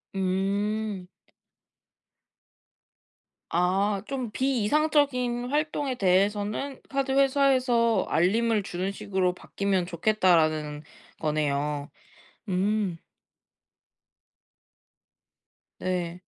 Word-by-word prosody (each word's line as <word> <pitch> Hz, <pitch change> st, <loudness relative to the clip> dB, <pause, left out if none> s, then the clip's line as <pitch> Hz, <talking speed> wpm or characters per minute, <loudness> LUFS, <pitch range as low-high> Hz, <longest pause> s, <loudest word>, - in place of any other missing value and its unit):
음. 195 Hz, +1 st, -1 dB, 2.4 s
아 190 Hz, +3 st, +1 dB
좀 260 Hz, -4 st, -3 dB
'비 260 Hz, -2 st, 0 dB
이상적인 255 Hz, -4 st, +1 dB
활동에 295 Hz, -3 st, -1 dB
대해서는 205 Hz, +7 st, 0 dB
카드 275 Hz, -1 st, -1 dB
회사에서 260 Hz, -5 st, +3 dB
알림을 215 Hz, +5 st, +2 dB
주는 185 Hz, +1 st, -3 dB
식으로 190 Hz, -2 st, -1 dB
바뀌면 195 Hz, -1 st, -1 dB
좋겠다.'라는 160 Hz, -5 st, +1 dB, 0.4 s
거네요. 150 Hz, -1 st, -1 dB, 0.6 s
음. 190 Hz, -1 st, 0 dB, 2.8 s
네. 180 Hz, -1 st, -3 dB
200 Hz, 155 characters per minute, -27 LUFS, 180-245 Hz, 2.8 s, 회사에서